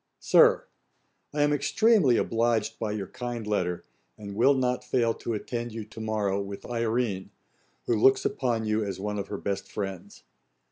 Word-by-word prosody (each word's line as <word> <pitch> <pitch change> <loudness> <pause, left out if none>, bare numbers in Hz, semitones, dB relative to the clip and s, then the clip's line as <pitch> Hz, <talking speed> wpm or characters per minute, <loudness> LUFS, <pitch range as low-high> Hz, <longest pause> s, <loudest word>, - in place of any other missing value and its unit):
] - - -53
'SIR, - - +5 0.7
'I 150 - -1
am 145 0 +3
extremely 155 - +3
obliged 115 -1 0
by 110 -2 -2
your 105 -2 -3
kind 120 +2 -5
letter, 90 -4 -1 0.3
and 100 -2 -8
will 130 +6 +4
not 125 -1 0
fail 115 -3 +1
to 115 - -4
attend 120 +2 -4
you 110 -2 -5
to 110 +1 -10
morrow 105 -3 -1
with 100 0 -7
Irene, 115 -4 -1 0.6
who - - +1
looks 130 +5 +4
upon 120 -4 0
you 110 0 +1
as 100 -2 -4
one 105 +1 -3
of 100 - -4
her 100 - -4
best 100 0 -4
friends. 95 -4 -6
110 Hz, 175 wpm, -27 LUFS, 100-120 Hz, 0.7 s, SIR